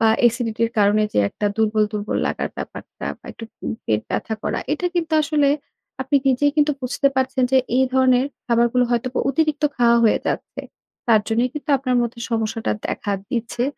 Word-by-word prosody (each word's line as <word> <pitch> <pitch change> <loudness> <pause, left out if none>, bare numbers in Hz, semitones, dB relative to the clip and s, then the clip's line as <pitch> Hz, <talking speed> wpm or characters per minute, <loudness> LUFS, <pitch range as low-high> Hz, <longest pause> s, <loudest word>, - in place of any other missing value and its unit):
বা 225 - +4 0.2
এসিডিটির 230 -1 0
কারণে 205 +1 +4
যে - - +1
একটা 205 - -3
দুর্বল, 215 -1 +2
দুর্বল 210 0 -2
লাগার - - -2
ব্যাপারটা - - -7
বা - - -42
একটু 225 - -9 0.2
উম - - -2
পেট 105 -1 +1
ব্যথা 220 - -2
করা, - - -1
এটা 355 +4 -1
কিন্তু 330 -2 -1
আসলে 290 -1 +2 0.5
আপনি 270 +2 +1
নিজেই 275 +3 +3
কিন্তু 295 0 +3
বুঝতে 255 +3 +1
পারছেন 260 0 +1
যে - - +6 0.2
এই 265 - +4
ধরনের 260 -1 +4 0.2
খাবারগুলো 240 +1 +3
হয়তো 240 +1 0 0.2
অতিরিক্ত 305 0 0
খাওয়া 235 -1 +4
হয়ে 220 - +4
যাচ্ছে। - - -3 0.5
তার 225 -2 +5
জন্যই 235 +3 +1
কিন্তু 300 0 -5
আপনার 255 -2 0
মধ্যে 235 0 -4
সমস্যাটা 225 0 -1
দেখা 205 - -3 0.2
দিচ্ছে। 240 -1 -2
245 Hz, 175 wpm, -21 LUFS, 225-265 Hz, 0.5 s, যে